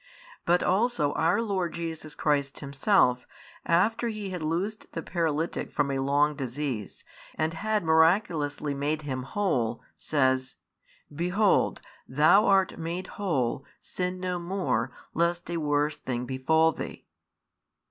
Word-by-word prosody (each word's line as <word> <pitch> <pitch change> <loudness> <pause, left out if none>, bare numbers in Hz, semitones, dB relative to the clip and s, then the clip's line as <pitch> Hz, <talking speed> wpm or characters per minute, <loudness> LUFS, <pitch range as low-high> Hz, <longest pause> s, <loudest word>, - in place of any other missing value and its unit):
But 175 +1 +3
also 190 -7 +2
our 175 +8 +2
Lord 190 -6 -1
Jesus 160 -2 -5
Christ 140 -2 0
Himself, 140 -2 +2 0.4
after 215 +8 +2
He 210 -4 -4
had 180 -2 -4
loosed 180 +7 -3
the 165 - -4
paralytic 165 -2 -2
from 145 -1 0
a 135 - -1
long 145 +2 +2
disease, 130 -5 -4 0.3
and 160 +1 -1
had 215 +4 -1
miraculously 160 -3 +2
made 150 +2 -2
him 130 -3 -3
whole, 130 - -1 0.2
says: 130 -3 +1 0.6
Behold, 180 +6 +2 0.3
thou 155 +10 +5
art 195 -3 +3
made 170 +3 -3 0.2
whole: 135 -9 0 0.2
sin 180 0 -4
no 180 -1 -2
more, 170 - -1 0.2
lest 170 +1 0
a 170 - -1
worse 150 -1 0
thing 125 -1 -3
befal 160 +5 +2
thee. - - -7
160 Hz, 125 wpm, -27 LUFS, 140-180 Hz, 0.6 s, thou